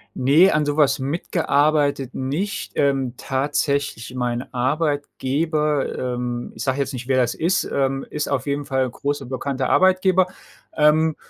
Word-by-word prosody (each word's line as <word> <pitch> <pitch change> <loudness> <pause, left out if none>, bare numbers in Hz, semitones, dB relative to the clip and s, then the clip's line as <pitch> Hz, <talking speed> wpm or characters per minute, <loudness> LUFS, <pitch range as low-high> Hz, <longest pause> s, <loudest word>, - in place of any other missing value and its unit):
Ne, 150 +9 +5
an 150 -1 +1
so 145 0 -1
was 150 -2 +3
mitgearbeitet 145 -2 0
nicht. 150 +11 -3
Ähm, 135 -3 +1
tatsächlich 140 -2 -1
mein 125 0 -3
Arbeitgeber, 145 +2 -1
ähm, 125 -1 -3
ich - - -6
sage 135 0 -1
jetzt 140 - -1
nicht, 125 -2 -7
wer 130 -1 +2
das 125 -2 +2
ist, 175 +4 +1
ähm, 135 0 0
ist 150 -1 -3
auf 135 -1 -1
jeden 145 0 -2
Fall 135 -2 0
'n - - -8
großer 140 +1 -3
bekannter 130 +1 -3
Arbeitgeber, 185 0 +4 0.5
ähm, 155 +1 +3
140 Hz, 150 wpm, -22 LUFS, 130-150 Hz, 0.5 s, Ne